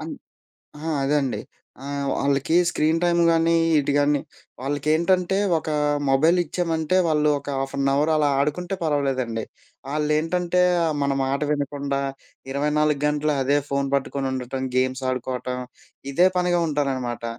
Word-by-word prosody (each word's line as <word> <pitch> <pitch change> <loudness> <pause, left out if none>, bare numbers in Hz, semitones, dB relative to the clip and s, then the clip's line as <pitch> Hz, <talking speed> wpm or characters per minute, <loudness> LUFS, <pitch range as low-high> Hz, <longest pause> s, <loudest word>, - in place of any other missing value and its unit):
ఆ! - - -6 1.0
అదండి. 140 -2 0 0.4
ఆహ్, 140 0 -3
వాళ్ళకి 140 +3 0
స్క్రీన్ 160 0 +1
టైం 175 0 +2
కానీ 165 0 +3 0.2
ఇటు 145 0 0
కాని 145 0 +2 0.4
వాళ్ళకేంటంటే 160 +7 +1 0.2
ఒకా 155 -1 -4 0.3
మొబైల్ 155 +6 +4
ఇచ్చామంటే 165 0 -1
వాళ్ళొక 150 -2 +1
హాఫ్ 135 0 -4
అన్ 135 0 +2
అవర్ 145 +3 +2
అలా 150 -1 +2
ఆడుకుంటే 175 +7 -1
పర్వాలేదండి. 135 -7 -1 0.4
వాళ్ళేంటంటే 160 +5 0 0.4
మన 140 - +1
మాట 135 +2 -1
వినకుండా 140 -1 -2 0.5
24 150 +1 +1
గంటలూ 150 +1 +1
అదే 140 +2 +2
ఫోన్ 140 0 -1
పట్టుకొనుండటం, 130 -1 -2
గేమ్స్ 130 +1 0
ఆడుకోవటం 125 0 -3 0.5
ఇదే 175 +6 +5
పనిగా 180 -1 +2
ఉంటారనమాట. 130 -5 -2
145 Hz, 115 wpm, -23 LUFS, 135-160 Hz, 1.0 s, ఇదే